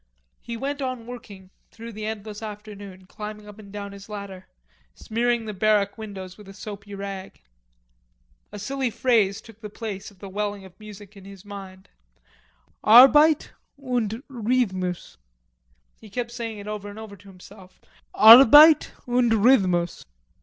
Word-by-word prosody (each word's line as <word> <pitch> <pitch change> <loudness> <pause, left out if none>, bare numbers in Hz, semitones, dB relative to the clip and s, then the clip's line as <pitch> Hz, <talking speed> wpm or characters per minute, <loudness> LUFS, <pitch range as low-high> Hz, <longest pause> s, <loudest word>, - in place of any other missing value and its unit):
He 235 -1 -7
went 280 +4 -4
on 255 -3 -4
working 205 -6 -11 0.2
through 230 +1 -10
the 215 0 -6
endless 215 -1 -7
afternoon, 205 -3 -10
climbing 210 +1 -9
up 210 +1 -13
and 200 -2 -13
down 200 0 -7
his 200 +1 -13
ladder, 200 -3 -8 0.5
smearing 235 +1 -1
the 215 - -5
barrack 205 0 +1
windows 200 -4 -9
with 210 - -14
a 195 - -12
soapy 205 -1 -9
rag. 195 -1 -8 1.1
A - - -8
silly 265 +5 -3
phrase 220 -4 +1
took 225 -1 -17
the 210 - -7
place 205 -2 -7
of 200 - -22
the 200 - -10
welling 205 0 -4
of 185 +1 -17
music 210 -1 -13
in 195 -1 -14
his 195 0 -13
mind: 195 -2 -11 1.0
"Arbeit 285 +7 +6 0.3
und 245 -4 -3
Rhythmus." 215 - -2 0.8
He 215 - -15
kept 235 +3 -4
saying 230 -3 -6
it 205 0 -10
over 210 -1 -6
and 205 - -11
over 220 -2 -10
to 200 +1 -19
himself: 190 0 -16 0.4
"Arbeit 275 +7 +9 0.2
und 245 -1 +2
Rhythmus." 195 -7 +2
210 Hz, 150 wpm, -24 LUFS, 200-230 Hz, 1.1 s, Arbeit